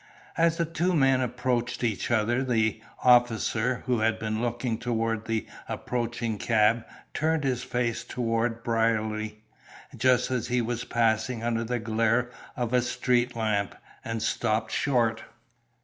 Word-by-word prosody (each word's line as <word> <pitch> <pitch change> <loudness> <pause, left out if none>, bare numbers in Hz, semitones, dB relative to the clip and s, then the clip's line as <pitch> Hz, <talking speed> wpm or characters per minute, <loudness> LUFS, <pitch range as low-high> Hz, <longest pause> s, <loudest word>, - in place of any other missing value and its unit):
As 165 0 +3
the 170 - +1
two 170 +3 0
men 135 -3 +4
approached 125 0 -1
each 115 -4 -1
other 120 +2 +2
the 110 -3 +1 0.2
officer, 120 -1 +3
who 125 -3 +1
had 110 0 +2
been 110 0 -2
looking 120 -1 -2
toward 115 -2 -1
the 115 -1 -1 0.2
approaching 120 -3 -3
cab, 115 0 +3 0.3
turned 160 0 +1
his 125 -2 0
face 120 -2 -1
toward 115 -1 -1
Brierly, 110 -2 0 0.5
just 125 +2 +2
as 125 -2 -1
he 125 +1 +1
was 120 +1 -2
passing 115 0 +1
under 115 -1 0
the 120 +1 -1
glare 115 +2 +1 0.3
of 120 -1 -2
a 125 - +4
street 125 0 0
lamp, 105 -3 -1 0.3
and 115 -1 -3
stopped 110 -1 0
short. 115 -5 +1
120 Hz, 140 wpm, -27 LUFS, 110-125 Hz, 0.5 s, men